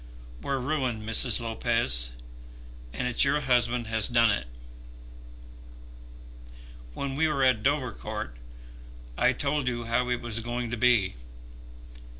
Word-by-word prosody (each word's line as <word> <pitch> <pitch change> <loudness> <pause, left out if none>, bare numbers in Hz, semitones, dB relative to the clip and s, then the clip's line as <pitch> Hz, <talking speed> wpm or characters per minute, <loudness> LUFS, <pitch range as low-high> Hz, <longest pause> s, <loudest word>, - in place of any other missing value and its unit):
We're 140 - -1
ruined, 125 -5 -2
Mrs. 115 +2 +4
Lopez, 115 - 0 0.8
and 125 - -3
it's 125 - +5
your 140 +1 +2
husband 125 -2 +2
has 110 -1 0
done 115 -2 +4
it. - - -2 2.5
When 140 -1 -3
we 160 +4 +2
were 140 -3 0
at 130 -4 +3
Dovercourt, 125 - -2 0.8
I - - +3
told 145 -2 -1
you 120 -1 -2
how 120 +2 0
it 125 -1 0
was 115 -1 -2
going 120 0 -4
to - - -1
be. 110 - +2
120 Hz, 125 wpm, -27 LUFS, 115-130 Hz, 2.5 s, it's